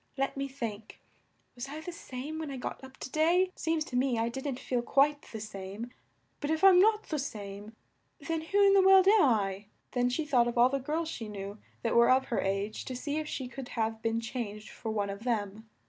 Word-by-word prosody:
Let 275 0 -1
me 275 0 -2
think: 230 -6 -6 0.5
was 250 +2 -7
I 300 +2 -6
the 320 +3 -6
same 300 -1 -6
when 315 -2 -4
I 270 - -5
got 250 - -6
up 265 0 -12
to 260 - -7
day? 350 +4 +3
Seems 320 -1 -1
to 250 - -7
me 250 -1 +2
I 225 +1 +1
didn't 265 +1 -4
feel 245 -2 -1
quite 285 +4 +3
the 220 - -5
same. 210 +2 -7 0.5
But 290 - -3
if 320 +3 0
I'm 380 -2 +8
not 430 +2 +4
the 310 - -1
same, 210 -4 -6 0.4
then 320 +2 -2
who 390 +6 0
in 395 - +6
the 395 - +6
world 380 0 +7
am 420 +1 +7
I?" 205 -6 +2 0.3
Then 245 0 +1
she 300 +5 -1
thought 250 -5 +3
of 240 - -3
all 245 +1 +6
the 275 +1 -1
girls 310 +5 -2
she 230 -8 -5
knew 200 0 -7 0.2
that 230 - 0
were 235 0 +6
of 260 +1 +3
her 235 - 0
age, 195 +2 -2
to 255 - -5
see 290 +4 -3
if 310 -1 -2
she 265 -3 -4
could 260 0 -8
have 225 0 -1
been 225 0 0
changed 220 -2 -5
for 225 - -6
one 205 -2 -1
of 200 +2 -8
them. 220 -2 -2
255 Hz, 230 wpm, -30 LUFS, 220-305 Hz, 0.5 s, I'm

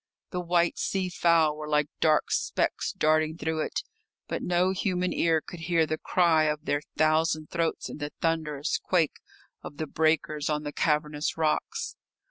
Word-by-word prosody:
The 180 - -2
white 175 -1 +1
sea 190 -2 -1
fowl 165 -3 +3
were 150 0 -7
like 150 -1 +2
dark 155 -1 +3
specks - - 0
darting 155 +1 +1
through 160 0 -2
it, - - -2 0.4
but - - -3
no 180 +1 +2
human 185 -1 -1
ear 165 -1 +2
could 175 - -10
hear 165 -1 +2
the 155 0 -3
cry 165 -3 +3
of 150 0 -1
their 145 - 0 0.2
thousand 155 0 +2
throats 165 -1 -1
in - - -8
the 145 0 -3
thunderous 155 -2 -1
quake 170 -5 +1 0.4
of 145 - -9
the 155 - -2
breakers 155 -1 0
on 150 0 -1
the 145 0 -5
cavernous 150 0 0
rocks. 445 - -1
160 Hz, 165 wpm, -27 LUFS, 150-170 Hz, 0.4 s, fowl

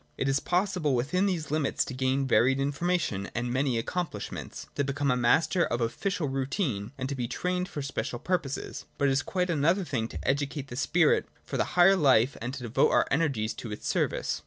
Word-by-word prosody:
It 135 - -1
is 135 +1 +2
possible 180 -6 0
within 180 +11 +1
these 165 -6 -2
limits 150 -3 +1
to - - -6
gain 130 +1 0
varied 130 +2 +3
information 145 - -1
and 120 +1 -1
many 130 -2 +1
accomplishments, 115 - -4
to 140 - 0
become 140 0 0
a - - +2
master 160 +8 +3
of 120 - -1
official 150 +8 -1
routine, 135 - -2
and 130 -1 -3
to 140 - -3
be 125 -3 -2
trained 180 +6 -2
for 145 - -5
special 120 -3 -3
purposes. 150 -2 -3
But 140 - +2
it - - +2
is 135 +1 +2
quite 180 +2 -1
another 165 +5 +2
thing 130 -8 -2
to - - -7
educate 140 0 -1
the 120 - -6
spirit 160 +4 +2 0.2
for - - -6
the - - -2
higher 185 +2 +7
life 135 -6 +4
and 120 +2 -3
to 130 - -7
devote 120 +4 +2
our - - +3
energies 140 -8 +1
to 115 - -7
its 105 - -6
service. - - 0
140 Hz, 205 wpm, -28 LUFS, 125-165 Hz, 0.2 s, higher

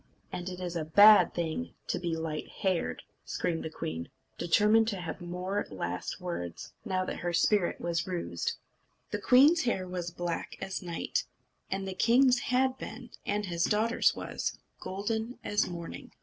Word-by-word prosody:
"And 180 +1 -4
it's 180 -1 -5
a 165 - -1
bad 200 +3 +7
thing 160 - -3
to - - -1
be 170 -2 -1
light 160 -1 -3
haired," 185 -3 -1 0.2
screamed 165 -2 -2
she, 80 +2 -3 0.3
determined 210 +5 +4
to 200 -4 -2
have 175 +1 -5
more 180 +3 -3
last 90 - -4
words, 130 - -5
now 185 -4 0
that - - -4
her 175 0 -2
spirit 195 +1 +2
was 170 +1 -1
roused. 180 -2 -2 0.6
The - - -1
queen's 290 +7 +6
hair 190 -6 0
was 180 -1 -3
black 175 -1 -4
as 190 +1 -4
night; 180 - -2 0.4
and 195 0 -2
the 190 - -3
king's 245 +5 +5
had 260 +1 +1
been, 240 -1 -8 0.2
and 205 +1 0
his 170 -2 -1
daughter's 220 +2 +3
was, - - -3 0.2
golden 220 +5 -3
as 205 -2 +1
morning. 170 -1 -7
185 Hz, 155 wpm, -30 LUFS, 170-210 Hz, 0.6 s, bad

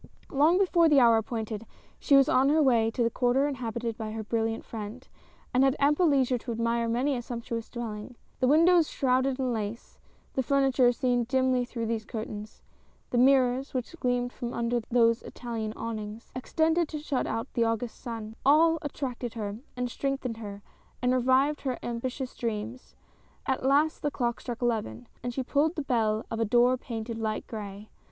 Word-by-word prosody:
Long 305 +6 +4
before 350 -4 +4
the 290 -2 +6
hour 230 -2 +6
appointed, 220 -1 -4 0.3
she 280 - +4
was 275 -1 +6
on 265 +2 +4
her 310 +2 +4
way 230 -4 +4
to 235 +2 -1
the 230 - +1
quarter 255 +4 +2
inhabited 235 -4 -4
by 215 -1 -4
her 220 0 -4
brilliant 225 +1 -1
friend; 225 +3 -7 0.5
and 255 +1 +4
had 270 0 +3
ample 295 +5 +3
leisure 260 -4 +2
to 240 - -6
admire 230 0 0
many 260 +5 +1
a 245 - -3
sumptuous 235 -1 -5
dwelling. 230 0 -6 0.2
The 255 - +2
windows 330 +3 +5
shrouded 260 0 +1
in 255 -2 -1
lace; 220 +1 -5 0.3
the 265 - +1
furniture 265 -2 +3
seen 245 -1 0
dimly 260 0 +1
through 235 -1 -4
these 225 -1 -2
curtains; 215 -1 -7 0.5
the 240 - +2
mirrors, 260 0 +3
which 255 +6 -3
gleamed 245 -1 0
from 240 -1 -5
under 235 +1 0
those 230 -1 +3
Italian 225 -3 -5
awnings 220 -1 -6
— - - -31
extended 320 +5 +1
to 310 - -4
shut 295 -3 -2
out 225 +4 -4
the 235 -2 +2
August 230 +1 -2
sun 225 -3 -6
— - - -33
all 325 +4 +5
attracted 255 -5 -4
her, 205 -2 -4 0.2
and 250 -1 -2
strengthened 270 -4 -2
her, 205 -2 -8 0.4
and 250 0 +3
revived 260 +4 +2
her 260 -3 -2
ambitious 250 +2 -4
dreams. 230 +2 -5 0.5
At 265 -2 -1
last 295 +3 +3
the 295 - 0
clock 240 -4 -2
struck 240 -1 -5
eleven, 210 - -1 0.2
and 245 - -3
she 260 +2 -3
pulled 300 +6 +1
the 300 - -2
bell 220 -4 0
of 225 - -2
a 225 - +2
door 240 +3 +4
painted 230 -2 -5
light 220 -1 -2
gray. 205 -1 -8
245 Hz, 185 wpm, -28 LUFS, 225-270 Hz, 0.5 s, the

